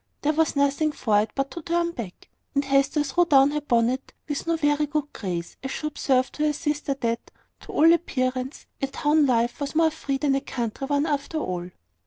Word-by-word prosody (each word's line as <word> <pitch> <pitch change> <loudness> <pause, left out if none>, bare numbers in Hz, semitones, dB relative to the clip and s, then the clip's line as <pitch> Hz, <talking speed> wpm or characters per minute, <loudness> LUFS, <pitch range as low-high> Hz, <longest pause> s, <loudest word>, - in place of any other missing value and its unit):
There 300 +1 +2
was 320 0 +1
nothing 280 +2 +2
for 210 -7 +2
it 215 - -3
but 275 0 -1
to 340 - -6
turn 340 +1 0
back; 225 - -8 0.3
and 280 0 +2
Hester 275 +2 +2
threw 295 +5 +2
down 280 -3 +5
her 300 0 -1
bonnet 245 -1 0
with 290 +1 -3
no 335 - +2
very 295 -1 +1
good 295 0 -2
grace, 175 -4 -4
as 265 - -4
she 305 - -4
observed 265 -3 +1
to 300 - -1
her 300 - +1
sister 295 -2 -2
that, 230 0 -2 0.3
to - - -11
all 325 +2 +6
appearance, 255 -5 -2 0.2
a 275 - +1
town 295 +2 +2
life 235 -1 +1
was 285 +1 -4
more 325 0 +4
free 280 -3 -3
than 275 0 +1
a 270 - +1
country 245 0 -4
one, 285 +1 +1
after 295 +1 -2
all. 180 - -3
280 Hz, 210 wpm, -25 LUFS, 255-300 Hz, 0.3 s, all